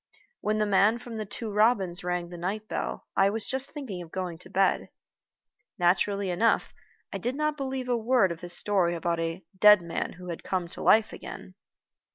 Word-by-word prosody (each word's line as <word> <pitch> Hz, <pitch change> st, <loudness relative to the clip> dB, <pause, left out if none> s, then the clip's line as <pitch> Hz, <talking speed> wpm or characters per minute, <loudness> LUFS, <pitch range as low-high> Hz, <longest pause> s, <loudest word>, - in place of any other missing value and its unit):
When 215 Hz, +1 st, 0 dB
the 215 Hz, -, +2 dB
man 205 Hz, +3 st, +4 dB
from 240 Hz, -2 st, -8 dB
The 215 Hz, -2 st, -4 dB
Two 220 Hz, +2 st, -5 dB
Robins 200 Hz, -4 st, +2 dB
rang 180 Hz, -1 st, -2 dB
the 175 Hz, -, -8 dB
night 205 Hz, +5 st, -3 dB
bell, -, -, -4 dB
I 195 Hz, 0 st, +4 dB
was 220 Hz, +1 st, -3 dB
just 265 Hz, +1 st, -1 dB
thinking 265 Hz, -, -6 dB
of 170 Hz, -, -10 dB
going 180 Hz, -3 st, -4 dB
to -, -, -13 dB
bed. 195 Hz, 0 st, +1 dB, 0.9 s
Naturally 190 Hz, +2 st, +2 dB
enough, 225 Hz, +6 st, +1 dB, 0.4 s
I -, -, -3 dB
did 245 Hz, +2 st, -2 dB
not 305 Hz, +1 st, 0 dB
believe 265 Hz, -2 st, -4 dB
a 245 Hz, -, +2 dB
word 230 Hz, -4 st, +3 dB
of 170 Hz, 0 st, -7 dB
his 175 Hz, 0 st, -1 dB
story 185 Hz, -4 st, +2 dB
about 170 Hz, 0 st, -1 dB
"a 165 Hz, +2 st, -3 dB
dead 210 Hz, -1 st, +7 dB
man 170 Hz, -1 st, -3 dB
who 180 Hz, 0 st, -10 dB
had 170 Hz, -, -6 dB
come 185 Hz, -2 st, -2 dB
to -, -, -8 dB
life 220 Hz, 0 st, +4 dB
again." -, -, -9 dB
200 Hz, 200 wpm, -28 LUFS, 175-225 Hz, 0.9 s, dead